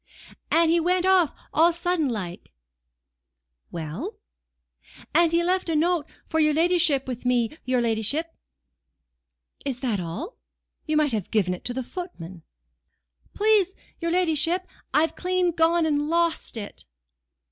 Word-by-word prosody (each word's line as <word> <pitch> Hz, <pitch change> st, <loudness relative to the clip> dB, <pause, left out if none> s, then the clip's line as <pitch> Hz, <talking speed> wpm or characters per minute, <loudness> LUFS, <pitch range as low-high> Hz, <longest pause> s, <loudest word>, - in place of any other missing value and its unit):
"And 330 Hz, 0 st, +4 dB
he 340 Hz, -, +4 dB
went 360 Hz, +2 st, +1 dB
off 375 Hz, -5 st, +4 dB, 0.2 s
all 320 Hz, -, +5 dB
on -, -, +6 dB
a 340 Hz, -, -3 dB
sudden 345 Hz, -4 st, 0 dB
like." 185 Hz, -7 st, -5 dB, 1.2 s
"Well?" 175 Hz, -, -6 dB, 1.0 s
"And 340 Hz, -1 st, +4 dB
he 340 Hz, +1 st, +2 dB
left 365 Hz, 0 st, 0 dB
a 325 Hz, -, +1 dB
note 330 Hz, 0 st, +1 dB, 0.2 s
for 320 Hz, -, 0 dB
your 305 Hz, -1 st, +3 dB
ladyship 330 Hz, -5 st, +3 dB
with 250 Hz, -2 st, -5 dB
me, 245 Hz, +1 st, +1 dB
your 255 Hz, -1 st, +1 dB
ladyship." 235 Hz, +9 st, 0 dB, 1.3 s
"Is 265 Hz, -3 st, -4 dB
that 235 Hz, -7 st, 0 dB
all? 180 Hz, -, -6 dB, 0.5 s
You 310 Hz, 0 st, +1 dB
might 300 Hz, -2 st, +2 dB
have 210 Hz, -5 st, -2 dB
given 195 Hz, -5 st, +1 dB
it 180 Hz, -, -8 dB
to 245 Hz, -, -2 dB
the 260 Hz, -, -2 dB
footman." 190 Hz, -, -8 dB, 0.9 s
"Please 415 Hz, -3 st, +3 dB, 0.2 s
your 335 Hz, -, -2 dB
ladyship, 345 Hz, 0 st, +2 dB, 0.3 s
I've 320 Hz, +2 st, +2 dB
clean 365 Hz, -1 st, 0 dB
gone 330 Hz, +1 st, +2 dB
and 295 Hz, -1 st, 0 dB
lost 335 Hz, -6 st, 0 dB
it." 205 Hz, -2 st, -7 dB
320 Hz, 145 wpm, -25 LUFS, 250-345 Hz, 1.3 s, on